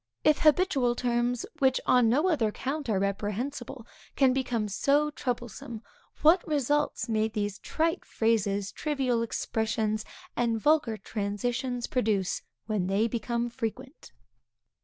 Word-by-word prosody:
If 305 -1 +4
habitual 300 -6 +3
terms, 240 0 0
which 265 -2 +3
on 250 -3 +5
no 295 +10 +3
other 300 -11 +2
account 270 +5 -3
are 210 - +2
reprehensible, 220 +6 -3 0.3
can 265 -2 +4
become 245 -5 -1
so 285 +9 +2
troublesome, 240 -4 -5 0.4
what 335 +4 +6
results 295 0 0
may 220 -1 +1
these 210 -2 -3
trite 325 +1 -1
phrases, 205 -3 0
trivial 265 -6 0
expressions, 220 -1 -1 0.3
and 230 -2 +1
vulgar 290 -4 +2
transitions 235 +5 -2
produce, 205 -7 0 0.2
when 210 -5 -1
they 200 +4 +2
become 235 +1 -2
frequent! 255 +4 -6
240 Hz, 120 wpm, -28 LUFS, 215-270 Hz, 0.4 s, what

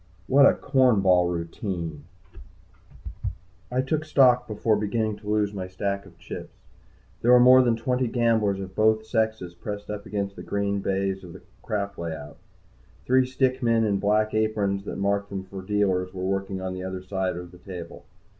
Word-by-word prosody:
What 140 +6 +6
a - - +4
corn 130 -6 +3
ball 90 -2 +4
routine! 85 -2 -4 1.6
I 125 +1 +1
took 155 +3 -1
stock 130 -5 +4
before 110 +1 +1
beginning 105 +1 -1
to 105 - -9
lose 105 -1 +1
my 95 -2 -4
stack 100 +1 -3
of 85 -3 -18
chips. 85 - -9 0.7
There 120 - +4
were 125 - +8
more 130 +1 +8
than 120 -2 +2
twenty 125 +2 0
gamblers 115 -4 +1
of 95 -1 -7
both 110 +1 +2
sexes 110 -6 -1
pressed 105 +4 -6
up 105 -1 -6
against 100 -1 -3
the - - -8
green 100 0 -1
baize 95 0 -1
of 85 -2 -10
the - - -12 0.2
crap 100 -3 -3
layout. 80 -3 -6 0.7
Three 130 0 +3
stick 130 0 0
men 115 -2 +3
in 100 -3 +1
black 105 +2 +2
aprons 105 -2 0
that - - -5
marked 100 +1 0
them 95 -1 -4
for 95 0 -8
dealers 95 -2 0
were 90 0 -3
working 95 0 -2
on 95 0 -3
the 95 - -6
other 95 0 -5
side 95 -1 -2
or 90 0 -6
the 90 0 -15
table. 90 -3 -9
100 Hz, 180 wpm, -25 LUFS, 95-110 Hz, 1.6 s, were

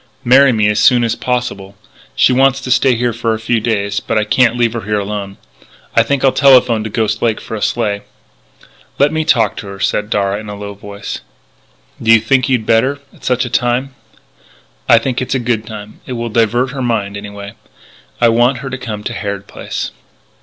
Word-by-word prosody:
"Marry 135 +2 +6
me 110 -3 +2
as 105 0 +1
soon 120 +3 +5
as 115 -1 +1
possible. 120 -7 -3 0.4
She 125 - +4
wants 135 +1 +3
to 130 - -4
stay 130 0 +3
here 120 0 0
for 115 0 -1
a - - -6
few 115 +1 0
days 100 -2 -1
but - - -2
I 105 - +2
can't 120 +2 +2
leave 120 -2 +1
her 115 - -3
here 105 +1 -1
alone. 100 -1 -4 0.6
I 115 - +6
think 135 +3 0
I'll 135 - +5
telephone 125 -6 +4
to 110 - -4
Ghost 110 0 -1
Lake 115 -2 +1
for - - -9
a 110 - -4
sleigh." 105 -3 -1 1.0
"Let 145 +1 +3
me 160 0 0
talk 115 -9 +2
to 100 - -7
her," 100 0 -9
said 105 +2 -1
Darragh 100 -1 0
in 105 -1 -9
a 105 - -6
low 100 0 -7
voice. 100 0 -7 0.8
"Do 115 - +3
you 115 - +7
think 130 +4 +1
you'd 125 -4 +1
better 120 +6 +2 0.2
at - - -21
such 125 0 0
a - - -5
time?" 125 +2 0 1.0
"I 115 - +8
think 125 +2 -1
it's 130 - -2
a - - +1
good 115 -3 -1
time. 105 -1 -9
It 130 - -4
will 120 -1 -3
divert 120 +3 +1
her 140 -1 -5
mind, 110 -5 -1
anyway. 100 0 -8 0.7
I 120 - +5
want 120 +3 +3
her 135 - -5
to 130 - -5
come 110 -5 -6
to - - -4
Harrod 100 -1 -4
Place." - - -5
115 Hz, 210 wpm, -15 LUFS, 105-125 Hz, 1.0 s, I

